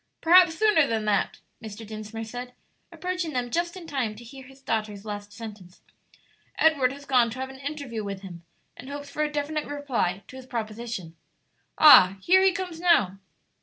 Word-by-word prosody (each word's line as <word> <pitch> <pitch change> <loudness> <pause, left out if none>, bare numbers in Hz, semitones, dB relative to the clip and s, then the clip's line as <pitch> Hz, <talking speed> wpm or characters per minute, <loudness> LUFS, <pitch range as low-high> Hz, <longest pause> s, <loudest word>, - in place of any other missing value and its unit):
"Perhaps 350 0 +6
sooner 420 -9 +4
than 220 -2 -1
that," 210 -1 0 0.3
Mr. 220 +1 -8
Dinsmore 215 +1 -7
said, 245 +2 -7 0.4
approaching 360 -3 -4
them 245 -1 -2
just 345 +4 -1
in 355 - -10
time 260 -9 -2
to 230 - -12
hear 265 +3 -12
his 270 0 -17
daughter's 215 -4 -3
last 205 -1 -6
sentence; 205 -5 -11 0.8
"Edward 285 -6 +3
has 280 +1 -11
gone 250 -4 +3
to 235 - -8
have 265 0 -4
an 265 - -13
interview 275 -6 -5
with 200 -1 -6
him, 175 -3 -10 0.3
and 260 - -11
hopes 285 0 -7
for 300 - -3
a 300 0 0
definite 300 +1 -3
reply 255 -10 -2
to 260 - -11
his 260 -1 -11
proposition. 220 -7 -5 0.6
Ah, 195 -11 +8
here 370 - +4
he 385 0 +5
comes 360 -2 -5
now!" 210 - +3
250 Hz, 180 wpm, -26 LUFS, 215-300 Hz, 0.8 s, Ah